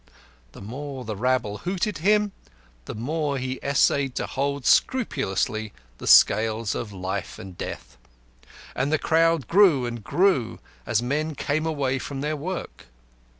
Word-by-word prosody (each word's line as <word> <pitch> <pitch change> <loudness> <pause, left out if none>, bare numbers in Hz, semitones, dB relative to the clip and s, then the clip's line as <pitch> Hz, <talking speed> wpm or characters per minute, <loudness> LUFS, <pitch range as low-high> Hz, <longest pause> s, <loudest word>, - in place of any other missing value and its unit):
The - - -11
more 130 +3 -6
the 110 -1 -4
rabble 115 -2 0
hooted 185 +1 -2
him, 210 +3 +3 0.5
the - - -6
more 145 +5 -2
he 130 0 -4
essayed 140 -1 +2
to - - -1
hold 140 -1 -2
scrupulously 125 - +1 0.3
the - - -7
scales 110 0 +5
of 110 - -5
life 95 0 -4
and 95 -1 -10
death. - - -7 0.8
And 140 +3 0
the 155 - +3
crowd 165 -4 +2
grew 170 -9 +5
and 120 -2 -5
grew, 175 - +1 0.3
as 110 - +1
men 150 +5 -1
came 155 +4 -1
away 135 -4 -1
from 135 +1 -5
their 150 +2 -1
work. 170 - -6
140 Hz, 145 wpm, -25 LUFS, 115-160 Hz, 0.8 s, scales